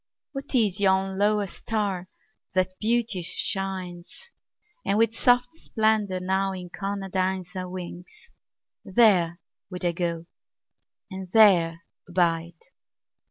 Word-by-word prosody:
What 275 0 -6
is 210 -5 +2
yon 190 -1 +2
lower 210 0 +2
star 195 -2 -3 0.5
that 185 0 +1
beauteous 220 -6 0
shines 185 -3 -3 0.7
And 200 - +1
with 225 0 +3
soft 245 +2 +3
splendor 215 - 0
now 190 +1 0
incarnadines 190 0 -3
Our 185 -1 -4
wings? 180 -1 -9 0.5
There 185 -6 +3 0.3
would 180 -2 -5
I 175 - +3
go 170 -1 -3 0.9
and 190 -1 -7
there 175 -7 +5 0.3
abide." 170 -1 0
190 Hz, 105 wpm, -25 LUFS, 180-210 Hz, 0.9 s, there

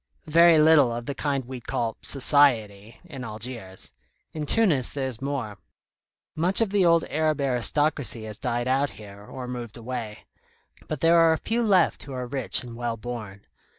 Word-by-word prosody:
"Very 170 +1 +5
little 150 -5 +5
of 120 0 -5
the 140 - -4
kind 140 -2 -2
we'd 125 -1 -9
call 115 -2 -2
'society' 120 -7 +2
in 140 -7 -9
Algiers. 110 -4 -4 0.4
In 150 -2 -5
Tunis 170 - +3
there's 130 -4 -5
more. 130 -8 -4 0.8
Much 175 +4 +1
of 225 -4 0
the 200 -2 +2
old 170 -1 +4
Arab 155 -1 0
aristocracy 135 -2 0
has 110 -1 -7
died 120 +1 -2
out 135 +2 +1
here, 100 -1 -12
or 125 +4 -8
moved 120 -3 -7
away; 115 -3 -6 0.6
but 155 -3 -5
there 165 +1 +5
are 165 -1 +5
a - - -1
few 230 +7 -2
left 205 -5 +2
who 140 - -6
are 125 -1 -4
rich 130 +1 +1
and 120 -2 -9
well 120 -1 -3
born. 110 -4 -8
130 Hz, 170 wpm, -25 LUFS, 115-155 Hz, 0.8 s, Very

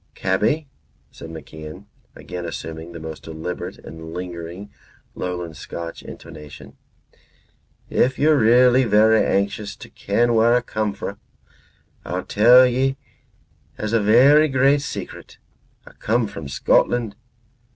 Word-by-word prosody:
"Cabby," 110 +12 0 0.4
said - - -11
MacIan, 80 +3 -10 0.3
again 90 -1 -7
assuming 80 0 -7
the 85 - -9
most 80 -2 -8
deliberate 80 +3 -6
and 80 0 -10
lingering 90 +2 -7 0.4
lowland 90 -3 -5
Scotch 85 +2 -7
intonation, 75 -1 -12 1.1
"if 130 +1 +1
ye're 155 +1 +4
really 125 +1 +5
verra 110 0 +4
anxious 100 +1 -1
to - - -13
ken 120 +4 0
whar 115 +1 +4
a' 125 - +1
come 110 -3 -2
fra', - - -6 0.8
I'll 90 +1 -4
tell 120 +5 +6
ye 130 +2 0 0.8
as 110 +1 -4
a 115 - +3
verra 135 +9 +6
great 135 +2 +3
secret. 150 - -8 0.5
A' - - -15
come 115 +2 0
from 80 -7 -8
Scotland. 110 - +1
105 Hz, 120 wpm, -21 LUFS, 85-120 Hz, 1.1 s, tell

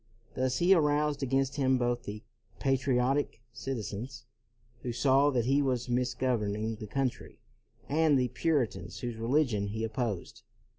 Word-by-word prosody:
Thus 130 0 0
he 180 +3 +5
aroused 150 -3 +2
against 135 +1 0
him 130 -2 +3
both 120 0 -1
the 105 +1 -6 0.3
patriotic 135 0 +1
citizens, 120 -1 -5 0.6
who 125 - -3
saw 135 +3 +4
that 125 -5 +1
he 135 +3 +3
was 125 -3 -1
misgoverning 120 -4 0
the 105 - -6
coun 135 +4 +1
try, - - -14 0.5
and 155 0 +3
the 125 -1 +1
Puritans 135 -1 -1
whose 120 -2 -4
religion 115 -3 +1
he 110 +2 -3
opposed. 110 -4 -3
125 Hz, 140 wpm, -30 LUFS, 115-135 Hz, 0.6 s, he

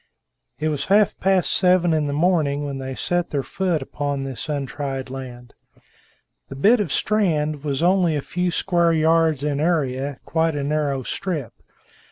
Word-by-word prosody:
It 155 - 0
was 150 -2 -2
half 205 +1 +3
past 190 -1 +2
seven 180 -2 +3
in 155 -2 +1
the - - -2
morning, 150 -2 +1
when 140 -1 -4
they 130 0 -5
set 175 +4 -1
their 140 -2 -2
foot 175 -4 -1
upon 140 0 -3
this 135 +3 -6
untried 135 -2 -4
land. 125 -2 -8 1.0
The 135 - -7
bit 215 - +4
of 195 -9 -2
strand 155 -8 0
was 145 0 -1
only 180 -3 +3
a 145 - -1
few 180 0 -1
square 170 0 +1
yards 160 -2 +2
in 145 -1 -1
area, 140 -4 -1
quite 160 -1 0
a 145 - -2
narrow 145 -2 -1
strip. 155 - -4
150 Hz, 165 wpm, -22 LUFS, 140-175 Hz, 1.0 s, bit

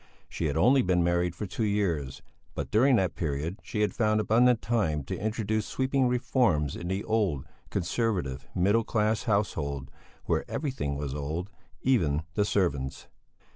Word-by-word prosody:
She 85 - -4
had 70 -2 0
only 130 +5 +5
been 90 -3 +2
married 85 0 +1
for 105 - -4
two 105 +4 -3
years, 85 -11 -1 0.3
but - - -4
during 130 +5 +5
that 95 -5 +1
period 80 +4 -3
she 105 - -3
had 105 - +1
found 110 -1 +2
abundant 115 +3 +4
time 95 -13 0
to - - -4
introduce 110 0 -1
sweeping 130 0 +1
reforms 120 - +1
in 85 - -6
the 95 +2 -2
old, 100 -11 0 0.2
conservative, 90 - -1
middle 100 +6 +3
class 110 0 0
household, 70 - -1 0.3
where - - +1
everything 130 - -2
was 70 -1 -3
old, 80 +7 -4 0.3
even 80 - +2
the 105 - +1
servants. 70 -10 -1
100 Hz, 155 wpm, -28 LUFS, 75-110 Hz, 0.3 s, only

